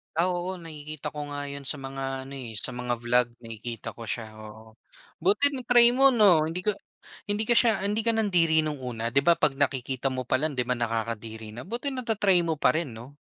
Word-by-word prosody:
Ah, 170 Hz, +2 st, +2 dB
oo. 180 Hz, +1 st, -3 dB
Nakikita 155 Hz, -2 st, -7 dB
ko 145 Hz, -1 st, -6 dB
nga 145 Hz, 0 st, -4 dB
'yon 140 Hz, 0 st, -7 dB
sa 140 Hz, +2 st, +1 dB
mga 135 Hz, 0 st, -5 dB
ano, 140 Hz, -, -8 dB
eh, 125 Hz, -4 st, -7 dB
sa 125 Hz, -, -1 dB
mga 125 Hz, -1 st, -3 dB
vlog, 120 Hz, +1 st, +2 dB
nakikita 115 Hz, 0 st, -7 dB
ko 115 Hz, -, -9 dB
siya, 110 Hz, 0 st, -5 dB
oo. 110 Hz, +1 st, -13 dB, 0.5 s
Buti 220 Hz, +10 st, +3 dB
na-try 245 Hz, -1 st, +5 dB
mo, 270 Hz, 0 st, +6 dB
'no? 195 Hz, -9 st, +5 dB
Hindi 165 Hz, +3 st, -2 dB
ka 210 Hz, -, +3 dB, 0.6 s
hindi 210 Hz, +2 st, +1 dB
ka 240 Hz, -, +5 dB
sha 225 Hz, -4 st, +4 dB
hindi 210 Hz, +2 st, -1 dB
ka 230 Hz, -, +4 dB
nandiri 175 Hz, -8 st, +2 dB
no'ng 155 Hz, -2 st, -3 dB
una, 115 Hz, -2 st, -4 dB
'di 135 Hz, +4 st, +2 dB
ba, 170 Hz, +2 st, +4 dB
'pag 135 Hz, -, +2 dB
nakikita 135 Hz, -1 st, 0 dB
mo 130 Hz, -1 st, -4 dB
pa -, -, +2 dB
lang, 150 Hz, +4 st, 0 dB
'di 125 Hz, -3 st, -2 dB
ba, 125 Hz, -, +1 dB
nakakadiri 115 Hz, -1 st, -4 dB
na, 120 Hz, -, -7 dB
buti 245 Hz, +7 st, -4 dB
nata-try 210 Hz, -7 st, +3 dB
mo 160 Hz, -3 st, -2 dB
parin, 155 Hz, -5 st, +2 dB
'no? 120 Hz, +5 st, -11 dB
145 Hz, 210 wpm, -26 LUFS, 120-185 Hz, 0.6 s, mo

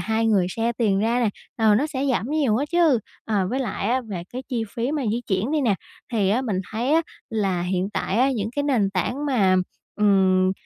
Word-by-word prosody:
hai 225 Hz, 0 st, 0 dB
người 200 Hz, -5 st, +3 dB
share 230 Hz, +4 st, -1 dB
tiền 210 Hz, -5 st, +1 dB
ra 230 Hz, +3 st, +1 dB
nè, 230 Hz, -, +2 dB, 0.3 s
ờ, 220 Hz, -2 st, +4 dB
nó 285 Hz, +8 st, +2 dB
sẽ 275 Hz, -3 st, -3 dB
giảm 235 Hz, -, -1 dB
nhiều 285 Hz, -8 st, +2 dB
á 280 Hz, -, 0 dB
chứ. 330 Hz, -8 st, +4 dB, 0.3 s
Ờ, 200 Hz, -4 st, 0 dB
với 260 Hz, -, -1 dB
lại 210 Hz, -4 st, -2 dB
á, 255 Hz, +2 st, +2 dB
về 200 Hz, -8 st, -6 dB
cái 255 Hz, -, -5 dB
chi 240 Hz, -4 st, -1 dB
phí 240 Hz, +4 st, -1 dB
mà 300 Hz, -2 st, -1 dB
di 235 Hz, +2 st, -1 dB
chuyển 190 Hz, +6 st, 0 dB
đi 310 Hz, -, +2 dB
nè, 225 Hz, -7 st, +2 dB, 0.4 s
thì 200 Hz, -4 st, +2 dB
á, 225 Hz, +5 st, +2 dB
mình 215 Hz, -7 st, -1 dB
thấy 235 Hz, +6 st, -1 dB
á, 330 Hz, -, +5 dB, 0.3 s
là 195 Hz, -6 st, 0 dB
hiện 185 Hz, +2 st, -1 dB
tại 195 Hz, -1 st, -2 dB
á, 265 Hz, +2 st, +4 dB
những 220 Hz, -4 st, -2 dB
cái 285 Hz, -, +1 dB
nền 240 Hz, -9 st, +1 dB
tảng 245 Hz, -, -2 dB
mà, 200 Hz, -9 st, +3 dB, 0.4 s
ừm, 190 Hz, -2 st, +3 dB
225 Hz, 230 wpm, -23 LUFS, 195-255 Hz, 0.4 s, á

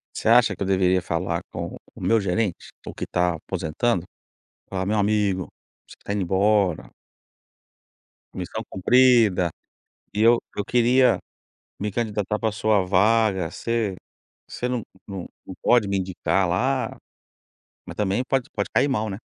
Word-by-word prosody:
Você -, -, -1 dB
acha 115 Hz, -3 st, +5 dB
que -, -, -20 dB
eu 100 Hz, -, 0 dB
deveria 95 Hz, -1 st, +2 dB
falar 85 Hz, -1 st, -2 dB
com -, -, -5 dB, 0.2 s
o -, -, -12 dB
meu 115 Hz, -1 st, +2 dB
gerente, 100 Hz, 0 st, -2 dB, 0.2 s
o -, -, -7 dB
que -, -, -5 dB
tá 90 Hz, 0 st, +1 dB
aposentando 85 Hz, +5 st, -2 dB, 0.6 s
falar 95 Hz, -1 st, -2 dB
meu 105 Hz, +2 st, +1 dB
amigo, 100 Hz, -3 st, +1 dB, 0.4 s
você -, -, -13 dB
que -, -, -41 dB
está 100 Hz, -, -3 dB
indo 105 Hz, -, -1 dB
embora 95 Hz, -1 st, +1 dB, 1.4 s
missão -, -, -5 dB
cumprida 110 Hz, -4 st, +4 dB, 0.6 s
e 105 Hz, -, -1 dB
eu, 115 Hz, +1 st, +6 dB, 0.2 s
eu 105 Hz, -, -1 dB
queria 125 Hz, +2 st, +3 dB, 0.6 s
me 105 Hz, 0 st, -2 dB
candidatar 105 Hz, -2 st, -1 dB
para 110 Hz, -, +1 dB
a -, -, -3 dB
sua 105 Hz, -2 st, +2 dB
vaga, 100 Hz, -2 st, +2 dB
você 115 Hz, -1 st, -2 dB, 0.5 s
você 125 Hz, -, -3 dB
não, 125 Hz, -2 st, -2 dB, 0.2 s
não 95 Hz, -3 st, -6 dB, 0.2 s
não 95 Hz, -, -8 dB
pode 120 Hz, -5 st, +4 dB
me 100 Hz, -, 0 dB
indicar 95 Hz, 0 st, 0 dB
lá, 130 Hz, +9 st, 0 dB, 0.9 s
mas -, -, -9 dB
também 105 Hz, +3 st, 0 dB
pode 135 Hz, -2 st, 0 dB
pode 100 Hz, -, -2 dB
cair 140 Hz, -, +3 dB
mal, 110 Hz, -4 st, -1 dB
né? 95 Hz, -, -5 dB
100 Hz, 155 wpm, -24 LUFS, 95-115 Hz, 1.4 s, eu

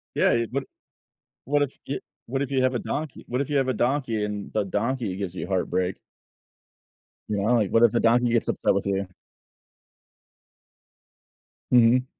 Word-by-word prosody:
Yeah, -, -, +4 dB
you'd 115 Hz, 0 st, 0 dB
but 135 Hz, +1 st, -1 dB, 0.8 s
what 145 Hz, +2 st, +2 dB
if 140 Hz, -2 st, -1 dB
yo 140 Hz, -, -2 dB, 0.3 s
what 135 Hz, +3 st, -2 dB
if 140 Hz, -1 st, -2 dB
you 130 Hz, -, +2 dB
have 130 Hz, 0 st, +2 dB
a 120 Hz, -, 0 dB
donkey 155 Hz, -2 st, -4 dB
what 125 Hz, +2 st, -1 dB
if 140 Hz, -, -3 dB
you 145 Hz, -, +1 dB
have 135 Hz, -1 st, +2 dB
a 130 Hz, -, +1 dB
donkey 120 Hz, -3 st, 0 dB
and 105 Hz, -1 st, -4 dB
the 105 Hz, -, +1 dB
donkey 105 Hz, 0 st, -1 dB
gives 95 Hz, -2 st, -4 dB
you -, -, -4 dB
heartbreak? 95 Hz, -1 st, -1 dB, 1.3 s
You 105 Hz, -, -1 dB
know, 105 Hz, +5 st, +2 dB
like, 105 Hz, -5 st, +2 dB
what 115 Hz, -, +4 dB
if 120 Hz, -, +6 dB
the 120 Hz, -, +1 dB
donkey 120 Hz, +1 st, +3 dB
gets 115 Hz, -1 st, +1 dB
upset -, -, +1 dB
with 100 Hz, -, -1 dB
you? 100 Hz, -1 st, -1 dB, 2.6 s
Mhm. 125 Hz, +1 st, +5 dB
120 Hz, 175 wpm, -25 LUFS, 105-130 Hz, 2.6 s, if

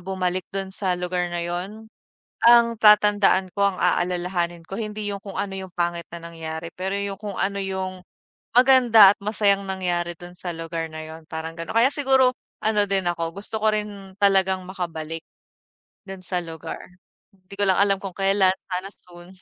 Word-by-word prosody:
bumalik 185 Hz, 0 st, -3 dB
dun 195 Hz, -1 st, -5 dB
sa 185 Hz, -3 st, -1 dB
lugar 180 Hz, 0 st, -2 dB
na 175 Hz, 0 st, -3 dB
yun. 200 Hz, +6 st, -6 dB, 0.5 s
Ang 235 Hz, -1 st, +6 dB
tatandaan 210 Hz, -3 st, +5 dB
ko 200 Hz, -, +2 dB
ang -, -, -9 dB
aalalahanin 175 Hz, -1 st, 0 dB
ko 195 Hz, -, -5 dB
hindi 215 Hz, -2 st, -4 dB
yung 200 Hz, -, -3 dB
kung 195 Hz, -, -7 dB
ano 195 Hz, -1 st, -4 dB
yung 190 Hz, -2 st, -8 dB
pangit 170 Hz, -1 st, -2 dB
na 170 Hz, -, -7 dB
nangyari, 160 Hz, 0 st, -6 dB
pero 190 Hz, +1 st, -3 dB
yung 200 Hz, 0 st, -3 dB
kung 205 Hz, -1 st, -7 dB
ano 200 Hz, +1 st, 0 dB
yung 190 Hz, -1 st, -4 dB, 0.5 s
maganda 245 Hz, -6 st, +7 dB
at -, -, -6 dB
masayang 200 Hz, -1 st, +1 dB
nangyari 175 Hz, -2 st, -2 dB
dun 175 Hz, +1 st, -11 dB
sa 175 Hz, -1 st, -6 dB
lugar 165 Hz, 0 st, -4 dB
na 155 Hz, 0 st, -8 dB
yun. 160 Hz, 0 st, -11 dB
Parang 160 Hz, 0 st, -5 dB
ganon. 165 Hz, +4 st, -7 dB
Kaya 245 Hz, +5 st, +5 dB
siguro 265 Hz, -3 st, +3 dB, 0.3 s
ano 210 Hz, -1 st, +2 dB
din 195 Hz, -1 st, 0 dB
ako 165 Hz, 0 st, -4 dB
gusto 220 Hz, -, -3 dB
ko 215 Hz, -, +1 dB
rin 200 Hz, -2 st, -6 dB
talagang 190 Hz, -2 st, +2 dB
makabalik, 165 Hz, -3 st, -5 dB, 0.8 s
dun 195 Hz, -1 st, -9 dB
sa 180 Hz, -2 st, -1 dB
lugar. 165 Hz, -2 st, -7 dB, 0.5 s
Hindi 190 Hz, 0 st, -16 dB
ko 205 Hz, -, 0 dB
lang 185 Hz, -, +2 dB
alam 195 Hz, -1 st, +3 dB
kung 195 Hz, -2 st, -5 dB
kelan 195 Hz, -1 st, +3 dB, 0.2 s
sana 185 Hz, +1 st, -4 dB
soon. 175 Hz, -1 st, -16 dB
190 Hz, 175 wpm, -23 LUFS, 175-205 Hz, 0.8 s, maganda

